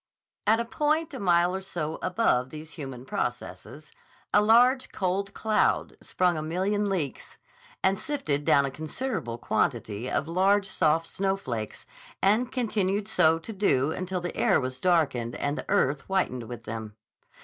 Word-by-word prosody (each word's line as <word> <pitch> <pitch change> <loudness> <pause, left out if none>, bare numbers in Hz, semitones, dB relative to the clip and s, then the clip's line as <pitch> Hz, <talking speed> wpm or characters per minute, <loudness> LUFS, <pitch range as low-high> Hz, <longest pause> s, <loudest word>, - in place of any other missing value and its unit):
At 220 +2 +5
a 235 - -1
point 305 +5 0
a 265 - -5
mile 175 -1 +3
or 190 - -3
so 160 -4 -4
above 155 - +1
these 155 +2 -8
human 135 -6 -7
processes 135 +4 -5 0.4
a 205 - +6
large, 245 +4 +4
cold 195 +1 -1
cloud 220 -1 +1
sprung 180 -1 +1
a - - -2
million 195 +6 0
leaks 170 -8 -3 0.5
and 195 +1 +2
sifted 160 - -1
down 140 -1 +4
a 135 - -3
considerable 155 - -4
quantity 110 0 -1
of 140 - -1
large, 195 +4 +2
soft 165 -2 +2
snowflakes, 185 - -3 0.3
and 220 +6 +2
continued 205 -4 0
so 165 -6 +4
to 165 +7 -8
do 155 -8 +2
until 185 +1 -3
the 175 - -5
air - - +3
was 130 0 -4
darkened 140 -10 +1
and 145 +1 -1
the - - -7
earth 140 +1 +2
whitened 130 -12 -1
with 120 -2 -7
them. 110 -2 -6
175 Hz, 155 wpm, -27 LUFS, 140-205 Hz, 0.5 s, a